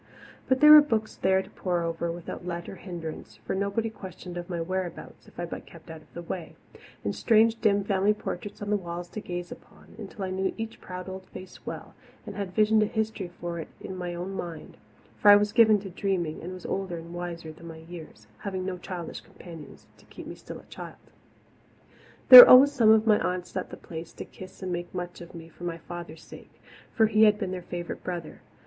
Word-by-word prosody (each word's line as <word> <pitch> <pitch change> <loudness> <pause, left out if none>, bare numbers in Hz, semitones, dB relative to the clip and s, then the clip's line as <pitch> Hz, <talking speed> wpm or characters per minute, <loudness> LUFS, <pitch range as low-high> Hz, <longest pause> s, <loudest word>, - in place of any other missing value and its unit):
But 260 0 +2
there 300 0 +9
were 305 0 +12
books 225 -7 -1
there 190 0 +2
to - - -16
pore 175 -2 -2
over 165 0 -2
without 170 +1 -7
let 170 -1 -5
or 195 - -8
hindrance 165 - -8
for - - -2
nobody 200 +3 -1
questioned 185 -3 -10
of 175 0 -6
my 175 -2 -3
whereabouts 180 0 -5
if - - -15
I 175 - -2
but 170 - -8
kept 165 0 -13
out 160 -1 -10
of - - -24
the 170 - -6
way 170 0 -6 0.5
and - - -1
strange, 225 0 +3
dim 200 -2 +3
family 200 +1 +2
portraits 205 +1 -6
on 205 - -3
the 210 - +3
walls 175 -1 -6
to 215 - -6
gaze 175 -2 -6
upon, - - -14
until 205 -1 -7
I 185 - -4
knew 190 0 -1
each 225 0 -6
proud 180 0 -8
old 190 0 -8
face 185 0 -12
well, - - -7 0.3
and 205 -3 -8
had 190 -3 -5
visioned 215 0 +4
a 215 - +2
history 220 -3 -3
for 170 -1 -4
it 160 - -6
in 190 - -7
my 175 -1 -5
own 180 +3 -5
mind 170 -4 -7 0.4
for 205 - +5
I 205 - +11
was 205 0 +2
given 220 -2 +5
to 195 -2 -8
dreaming 175 -4 -2
and 175 - -6
was 185 -1 -9
older 190 -3 -3
and 165 +1 -10
wiser 170 -2 -6
than 170 +2 -13
my 165 -1 -9
years, 160 -9 -11
having 190 -2 -4
no 185 -1 -4
childish 175 -2 -7
companions 165 -4 -13
to - - -21
keep - - -11
me - - -7
still - - -10
a - - -14
child. - - -11 1.2
There 255 -1 +16
were - - +8
always 270 +3 +9
some 240 -6 +4
of 220 0 +6
my 215 -2 +4
aunts 180 0 -3
at 185 - -3
the - - -9
Place 165 0 -9
to - - -8
kiss 185 +1 -12
and 185 -1 -3
make 175 +1 -5
much 175 -1 -5
of 170 0 -11
me 165 -1 -9
for 165 +2 -15
my 170 -1 -3
father's 170 -1 -9
sake - - -14 0.3
for 220 - +3
he 220 0 +5
had 210 -1 +4
been 195 -4 -3
their 185 -1 -4
favourite 175 0 -6
brother. 175 -3 -6
185 Hz, 225 wpm, -27 LUFS, 175-205 Hz, 1.2 s, There